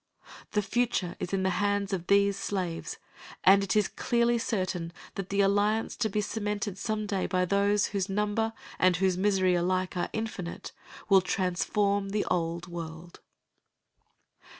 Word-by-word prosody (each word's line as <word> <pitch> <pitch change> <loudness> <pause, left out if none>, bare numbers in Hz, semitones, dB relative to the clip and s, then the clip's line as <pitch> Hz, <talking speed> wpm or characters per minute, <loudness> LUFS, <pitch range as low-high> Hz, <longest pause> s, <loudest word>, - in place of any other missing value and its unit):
The 210 -1 +2
future 220 -4 0
is 180 - -4
in 195 -1 0
the 190 - +2
hands 205 -1 0
of 180 -2 -3
these 200 0 +4
slaves, 180 -4 -3 0.5
and 195 +1 +6
it 200 - -1
is 210 -2 +3
clearly 235 0 +1
certain 185 -7 -2 0.2
that 195 -1 -5
the 200 0 +2
alliance 205 +3 +2
to 220 - 0
be 210 +1 0
cemented 205 -2 -3
some 215 0 -2
day 200 -2 -1
by 180 0 +1
those 200 +2 +2
whose 195 -1 -1
number 210 +3 0 0.3
and 185 -1 +4
whose 185 +1 +2
misery 190 -1 +2
alike 185 +1 0
are 175 - -1
infinite 220 -6 -5 0.4
will 195 -2 +6
transform 195 +2 0
the 205 +1 -1
old 170 0 -1
world. 170 -1 -8
195 Hz, 150 wpm, -29 LUFS, 180-210 Hz, 0.5 s, and